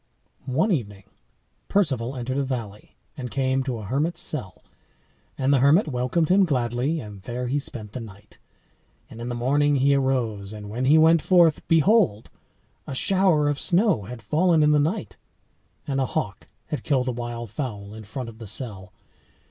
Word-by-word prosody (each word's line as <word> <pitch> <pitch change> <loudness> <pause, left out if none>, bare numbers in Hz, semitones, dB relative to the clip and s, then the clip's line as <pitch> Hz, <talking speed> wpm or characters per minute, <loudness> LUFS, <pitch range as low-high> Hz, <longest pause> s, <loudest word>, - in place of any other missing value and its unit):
One 135 - +1
evening 105 - -2 0.6
Perceval 135 - 0
entered 130 +2 -3
a - - +1
valley, 115 -6 -6 0.2
and 125 -2 -6
came 135 0 0
to 130 -3 -3
a 110 - -7
hermit's 145 - -1
cell; 115 - -5 0.7
and 135 +1 +2
the 135 - +4
hermit 150 - +4
welcomed 130 +4 0
him 195 +2 +5
gladly, 130 0 0
and 105 -5 -9
there 120 +5 -4
he 140 +4 0
spent 110 -6 -7
the 125 - -6
night. 105 -2 -13 0.7
And 115 - -9
in 120 - -4
the 120 - -3
morning 145 +4 +2
he 140 +1 +3
arose, 120 -7 -1
and 105 -1 -8
when 125 +4 -2
he 150 +4 +6
went 160 +1 +5
forth, 170 -4 +3
behold! 165 - +3 0.6
a 135 - -5
shower 185 -2 +3
of 145 -1 0
snow 180 - +2
had 115 +1 -9
fallen 160 - +3
in 150 - +4
the 150 - +4
night, 145 - -2 0.7
and 135 -1 -1
a 130 - 0
hawk 100 -3 -4 0.2
had 150 -5 -3
killed 130 -2 0
a - - +1
wild 120 -2 -6
fowl 105 -5 -5
in 110 0 -9
front 125 +4 -6
of 115 -1 -11
the 110 - -8
cell. 100 -4 -5
130 Hz, 180 wpm, -24 LUFS, 115-150 Hz, 0.7 s, he